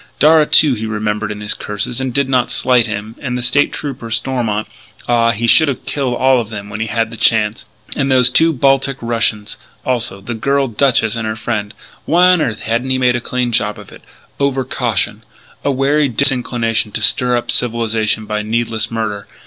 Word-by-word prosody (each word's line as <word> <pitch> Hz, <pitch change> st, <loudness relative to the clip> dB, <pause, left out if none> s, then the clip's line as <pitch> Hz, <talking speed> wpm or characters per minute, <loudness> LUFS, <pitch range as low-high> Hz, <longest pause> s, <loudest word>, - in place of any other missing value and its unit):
Darragh, 155 Hz, 0 st, +5 dB
too, 150 Hz, -4 st, +5 dB
he 110 Hz, -1 st, -4 dB
remembered 105 Hz, -1 st, -2 dB
in 105 Hz, 0 st, -7 dB
his 105 Hz, -, -1 dB
curses, 105 Hz, +5 st, -4 dB
and 130 Hz, -1 st, -2 dB
did 140 Hz, +2 st, 0 dB
not 130 Hz, -2 st, +1 dB
slight 125 Hz, -2 st, +2 dB
him. 110 Hz, +1 st, -5 dB
And 125 Hz, -3 st, -3 dB
the 125 Hz, +4 st, +2 dB
trooper, 135 Hz, -6 st, -6 dB
Stormont 115 Hz, -2 st, -1 dB, 0.4 s
ah, 115 Hz, -1 st, +3 dB
he 115 Hz, +1 st, -1 dB
should 155 Hz, +7 st, +5 dB
have 140 Hz, -, -3 dB
killed 135 Hz, -4 st, -2 dB
all 130 Hz, 0 st, +3 dB
of 110 Hz, -, -8 dB
them 105 Hz, -2 st, -7 dB
when 105 Hz, -, -5 dB
he 110 Hz, -, -2 dB
had 115 Hz, 0 st, -1 dB
the 115 Hz, -, -8 dB
chance.... 110 Hz, -1 st, +1 dB, 0.3 s
And 135 Hz, -1 st, 0 dB
those 125 Hz, -2 st, +5 dB
two 165 Hz, +5 st, +4 dB
Baltic 135 Hz, -1 st, +1 dB
Russians, 115 Hz, -3 st, -2 dB, 0.3 s
also, 115 Hz, -6 st, -1 dB
the 110 Hz, +5 st, -6 dB
girl 140 Hz, +4 st, 0 dB
duchess 120 Hz, -2 st, +1 dB
and 115 Hz, -2 st, -3 dB
her 110 Hz, -, -2 dB
friend. 110 Hz, -2 st, -3 dB, 0.3 s
Why 180 Hz, +2 st, +4 dB
on 180 Hz, -3 st, +4 dB
earth 110 Hz, -8 st, -2 dB
hadn't 115 Hz, +4 st, -1 dB
he 130 Hz, -, +2 dB
made 125 Hz, -1 st, +2 dB
a 120 Hz, -, -2 dB
clean 125 Hz, 0 st, -2 dB
job 105 Hz, -2 st, 0 dB
of -, -, -13 dB
it? -, -, -14 dB, 0.4 s
Over 140 Hz, -1 st, 0 dB
caution. 120 Hz, -5 st, -1 dB, 0.4 s
A -, -, 0 dB
wary 140 Hz, +2 st, +2 dB
disinclination 120 Hz, -3 st, 0 dB
to -, -, -2 dB
stir 125 Hz, -1 st, +3 dB
up 120 Hz, -, -3 dB
civilization 110 Hz, -2 st, 0 dB
by 105 Hz, 0 st, -2 dB
needless 110 Hz, +1 st, -2 dB
murder. 105 Hz, -4 st, -4 dB
120 Hz, 195 wpm, -16 LUFS, 110-130 Hz, 0.4 s, Darragh